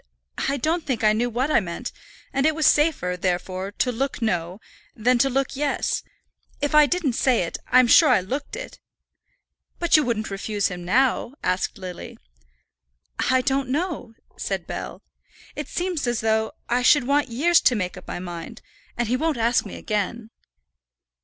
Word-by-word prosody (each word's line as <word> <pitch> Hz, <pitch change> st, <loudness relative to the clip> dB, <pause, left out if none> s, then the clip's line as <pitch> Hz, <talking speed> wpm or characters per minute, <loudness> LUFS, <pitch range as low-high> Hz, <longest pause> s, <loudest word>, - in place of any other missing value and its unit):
I 280 Hz, -, 0 dB
don't 320 Hz, +5 st, 0 dB
think 255 Hz, -6 st, -2 dB
I 215 Hz, 0 st, +5 dB
knew 240 Hz, +3 st, 0 dB
what 255 Hz, +6 st, -1 dB
I -, -, +5 dB
meant; 170 Hz, -5 st, -5 dB, 0.4 s
and 275 Hz, +2 st, +2 dB
it 315 Hz, -, +1 dB
was 315 Hz, -1 st, 0 dB
safer, 295 Hz, -, +3 dB
therefore, 185 Hz, +1 st, -2 dB
to 250 Hz, -, 0 dB
look 265 Hz, +3 st, -2 dB
no, 180 Hz, -5 st, -1 dB, 0.4 s
than 240 Hz, +2 st, +2 dB
to 270 Hz, -, +4 dB
look 270 Hz, +1 st, -1 dB
yes. 285 Hz, 0 st, -1 dB, 0.6 s
If 290 Hz, 0 st, -1 dB
I 300 Hz, -1 st, +7 dB
didn't 345 Hz, -7 st, 0 dB
say 245 Hz, -3 st, +2 dB
it, 165 Hz, -, -5 dB
I'm 255 Hz, 0 st, +6 dB
sure 300 Hz, +6 st, +6 dB
I 250 Hz, -, +5 dB
looked 265 Hz, +11 st, -5 dB
it." -, -, -8 dB, 1.0 s
"But 345 Hz, -1 st, +3 dB
you 305 Hz, -, +5 dB
wouldn't 225 Hz, -5 st, -2 dB
refuse 205 Hz, +1 st, -1 dB
him 180 Hz, -1 st, -7 dB
now?" 250 Hz, +6 st, +1 dB
asked 185 Hz, +1 st, -1 dB
Lily. 185 Hz, -2 st, -8 dB, 1.1 s
"I 260 Hz, 0 st, +4 dB
don't 270 Hz, 0 st, 0 dB
know," 295 Hz, -5 st, -3 dB, 0.2 s
said -, -, -3 dB
Bell. -, -, -6 dB, 0.5 s
"It -, -, -5 dB
seems 350 Hz, -6 st, -2 dB
as 240 Hz, -1 st, 0 dB
though 220 Hz, 0 st, +1 dB
I 245 Hz, +1 st, +1 dB
should 285 Hz, +2 st, +5 dB
want 285 Hz, +2 st, +2 dB
years 325 Hz, +9 st, +3 dB
to 250 Hz, -, +3 dB
make 185 Hz, -3 st, -2 dB
up 185 Hz, -, -12 dB
my -, -, -4 dB
mind; 175 Hz, +5 st, -8 dB, 0.3 s
and 240 Hz, -1 st, 0 dB
he 245 Hz, -, +1 dB
won't 315 Hz, +2 st, 0 dB
ask 235 Hz, +2 st, +2 dB
me -, -, -8 dB
again." 215 Hz, +2 st, -3 dB
245 Hz, 175 wpm, -23 LUFS, 210-280 Hz, 1.1 s, I